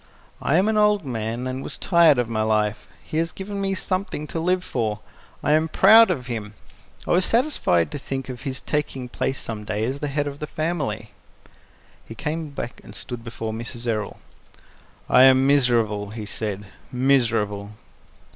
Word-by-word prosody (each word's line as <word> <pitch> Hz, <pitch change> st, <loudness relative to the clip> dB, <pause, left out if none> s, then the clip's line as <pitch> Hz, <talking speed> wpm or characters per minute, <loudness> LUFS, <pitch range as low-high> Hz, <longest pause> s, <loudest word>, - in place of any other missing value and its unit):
I 140 Hz, -, +1 dB
am 190 Hz, +3 st, +3 dB
an 220 Hz, 0 st, +1 dB
old 210 Hz, -4 st, +3 dB
man, 115 Hz, 0 st, -3 dB
and 130 Hz, +1 st, -3 dB
was -, -, -6 dB
tired 170 Hz, -6 st, +5 dB
of 125 Hz, -2 st, +1 dB
my 110 Hz, -1 st, -1 dB
life. 105 Hz, -1 st, 0 dB, 0.2 s
He 155 Hz, -, -5 dB
has 165 Hz, 0 st, 0 dB
given 200 Hz, +1 st, -5 dB
me 195 Hz, 0 st, 0 dB
something 185 Hz, -4 st, -3 dB
to 165 Hz, -, -3 dB
live 180 Hz, +2 st, +1 dB
for. 110 Hz, -, -2 dB, 0.4 s
I -, -, +2 dB
am 155 Hz, +1 st, +3 dB
proud 225 Hz, +7 st, +7 dB
of 125 Hz, -, -2 dB
him. 110 Hz, -4 st, -5 dB, 0.5 s
I -, -, 0 dB
was 180 Hz, +2 st, +4 dB
satisfied 225 Hz, -, +2 dB
to -, -, -4 dB
think 135 Hz, -1 st, -5 dB
of 125 Hz, -2 st, -7 dB
his 130 Hz, -2 st, -4 dB
taking 150 Hz, -3 st, -2 dB
his 125 Hz, -, -9 dB
place 135 Hz, -, -2 dB
some 110 Hz, -2 st, -5 dB
day 105 Hz, +1 st, -2 dB
as 135 Hz, +4 st, -3 dB
the 145 Hz, -, -2 dB
head 145 Hz, +1 st, -1 dB
of 145 Hz, 0 st, -6 dB
the 150 Hz, -, -4 dB
family." 145 Hz, -10 st, -3 dB, 0.9 s
He 115 Hz, -, -10 dB
came 155 Hz, +5 st, -3 dB
back 135 Hz, -3 st, -6 dB
and -, -, -12 dB
stood 120 Hz, -2 st, -7 dB
before 115 Hz, -1 st, -5 dB
Mrs. 115 Hz, +1 st, -7 dB
Errol. 110 Hz, -3 st, -2 dB, 0.9 s
"I 125 Hz, -, +6 dB
am 130 Hz, 0 st, +6 dB
miserable," 115 Hz, -7 st, +2 dB
he 110 Hz, 0 st, -6 dB
said. 105 Hz, -1 st, -4 dB, 0.3 s
"Miserable!" 115 Hz, -6 st, +1 dB
130 Hz, 185 wpm, -23 LUFS, 110-155 Hz, 0.9 s, proud